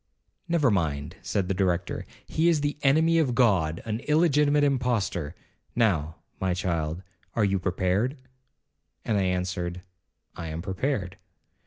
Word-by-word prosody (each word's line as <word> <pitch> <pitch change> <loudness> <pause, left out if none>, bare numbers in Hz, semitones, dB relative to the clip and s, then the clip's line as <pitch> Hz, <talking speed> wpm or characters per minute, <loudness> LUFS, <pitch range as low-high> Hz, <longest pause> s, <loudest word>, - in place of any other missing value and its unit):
'Never 160 -8 +3
mind,' 75 -7 -1
said 100 -3 -1
the 95 - 0
Director, 90 -2 -1 0.2
'he 165 +2 +2
is 160 -3 +2
the 145 0 -1
enemy 160 +4 +4
of 130 -7 +1
God,—an 105 -2 +1
illegitimate 150 -2 +4
impostor. 115 - 0 0.4
Now, 85 -10 +1 0.2
my 95 -2 0
child, 85 -1 -2 0.3
are 110 - +3
you 100 -1 +1
prepared?' 95 +8 0 0.9
and 110 - +1
I - - +2
answered, 90 -1 -2 0.5
'I 85 - -6
am 80 +1 -4
prepared.' 95 -1 -2
95 Hz, 130 wpm, -27 LUFS, 90-135 Hz, 0.9 s, enemy